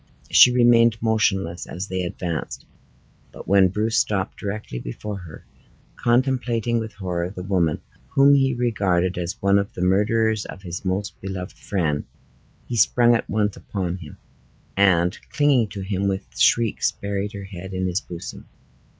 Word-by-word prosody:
She 125 Hz, -, +8 dB
remained 120 Hz, -2 st, +4 dB
motionless 95 Hz, -6 st, 0 dB
as 90 Hz, +3 st, -5 dB
they 95 Hz, -1 st, -2 dB
advanced. 85 Hz, -2 st, -4 dB, 0.7 s
But -, -, -11 dB
when 95 Hz, -1 st, +5 dB
Bruce 105 Hz, +4 st, 0 dB
stopped 95 Hz, -3 st, -1 dB
directly 100 Hz, -, -5 dB
before 100 Hz, +13 st, -6 dB
her, 85 Hz, -4 st, -12 dB, 0.5 s
contemplating 120 Hz, -2 st, +1 dB
with 110 Hz, -1 st, -6 dB
horror 90 Hz, -3 st, -3 dB
the 90 Hz, -1 st, -8 dB
woman 90 Hz, -5 st, 0 dB, 0.3 s
whom 140 Hz, +1 st, +5 dB
he 135 Hz, -2 st, +3 dB
regarded 100 Hz, -7 st, +1 dB
as 85 Hz, +1 st, -4 dB
one 100 Hz, 0 st, +4 dB
of 100 Hz, -, -3 dB
the 90 Hz, -, -3 dB
murderers 110 Hz, +3 st, +2 dB
of 95 Hz, -, -10 dB
his 90 Hz, -1 st, -6 dB
most 95 Hz, +2 st, -3 dB
beloved 95 Hz, -2 st, -6 dB
friend, 80 Hz, -7 st, -1 dB, 0.6 s
she 120 Hz, -, -3 dB
sprung 120 Hz, +3 st, +4 dB
at 115 Hz, -, -1 dB
once 105 Hz, -1 st, 0 dB
upon 95 Hz, -3 st, -4 dB
him, 80 Hz, -5 st, -11 dB, 0.6 s
and 90 Hz, -1 st, +3 dB
clinging 140 Hz, -6 st, +3 dB
to 100 Hz, -1 st, -7 dB
him, 95 Hz, 0 st, -1 dB
with 95 Hz, -1 st, -2 dB
shrieks 115 Hz, -2 st, +3 dB
buried 100 Hz, +1 st, -4 dB
her 100 Hz, -1 st, -7 dB
head 95 Hz, -1 st, -8 dB
in 95 Hz, 0 st, -2 dB
his 90 Hz, +1 st, -1 dB
bosom. 85 Hz, -1 st, -9 dB
100 Hz, 155 wpm, -23 LUFS, 90-110 Hz, 0.7 s, She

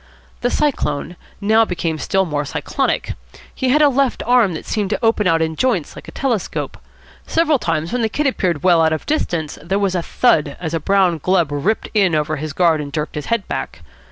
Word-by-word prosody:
The 245 Hz, -, 0 dB
Cyclone 175 Hz, -, -1 dB, 0.2 s
now 220 Hz, +2 st, +4 dB
became 170 Hz, -6 st, -2 dB
still 190 Hz, +5 st, +1 dB
more 150 Hz, -3 st, -2 dB
cyclonic. 145 Hz, -, -2 dB, 0.4 s
He 260 Hz, -, -1 dB
had 300 Hz, +4 st, +4 dB
a -, -, +7 dB
left 275 Hz, -2 st, +1 dB
arm 240 Hz, -6 st, +4 dB
which -, -, -7 dB
seemed 210 Hz, -3 st, -1 dB
to 220 Hz, -, -1 dB
open 220 Hz, -3 st, +2 dB
out 165 Hz, -2 st, +3 dB
in 160 Hz, 0 st, -2 dB
joints 210 Hz, -, 0 dB
like -, -, -11 dB
a -, -, -8 dB
telescope. 240 Hz, -8 st, -2 dB, 0.5 s
Several 315 Hz, -4 st, +2 dB
times 165 Hz, 0 st, -2 dB
when 250 Hz, -, 0 dB
the 225 Hz, -, +1 dB
Kid 295 Hz, +7 st, -2 dB
appeared 180 Hz, -, 0 dB
well 175 Hz, -3 st, +5 dB
out 160 Hz, 0 st, +3 dB
of 155 Hz, -, -4 dB
distance 170 Hz, -, -2 dB
there 190 Hz, +5 st, -1 dB
was 200 Hz, -2 st, 0 dB
a 180 Hz, -, 0 dB
thud 155 Hz, -, +1 dB
as 165 Hz, -2 st, -4 dB
a 165 Hz, -, 0 dB
brown 185 Hz, 0 st, +2 dB
glove 175 Hz, -2 st, +1 dB
ripped 150 Hz, +10 st, -1 dB
in 195 Hz, -6 st, +3 dB
over 155 Hz, +1 st, 0 dB
his 155 Hz, +1 st, -4 dB
guard 165 Hz, 0 st, +2 dB
and 145 Hz, -1 st, -6 dB
jerked 150 Hz, +1 st, -3 dB
his 150 Hz, -2 st, -5 dB
head 230 Hz, -4 st, -1 dB
back. -, -, -5 dB
180 Hz, 215 wpm, -19 LUFS, 160-225 Hz, 0.5 s, a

